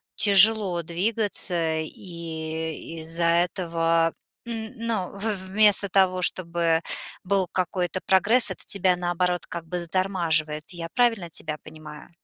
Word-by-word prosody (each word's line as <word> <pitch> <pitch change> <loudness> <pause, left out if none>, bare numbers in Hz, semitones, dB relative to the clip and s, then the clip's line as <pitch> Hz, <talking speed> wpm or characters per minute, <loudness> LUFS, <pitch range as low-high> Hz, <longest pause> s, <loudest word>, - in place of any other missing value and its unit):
тяжело 200 -3 +5
двигаться, 175 -3 0
и 160 -1 -7
из-за 165 +2 -1 0.2
этого, 165 -2 -1 0.3
м, 225 -2 -5
ну, 225 -5 -4
в - - -11 0.3
вместо 205 0 +5
того, 185 -1 +1
чтобы 170 -2 0 0.4
был 190 -1 +1
какой-то 185 0 -2
прогресс, 205 +3 +4
это - - -9
тебя 185 -2 +2
наоборот 175 0 -2
как 170 -1 -8
бы 175 +2 -5
затормаживает. 165 -4 -2
Я 170 -2 -8
правильно 225 -8 0
тебя 155 -1 -3
понимаю? 155 -1 -13
175 Hz, 120 wpm, -23 LUFS, 165-195 Hz, 0.4 s, тяжело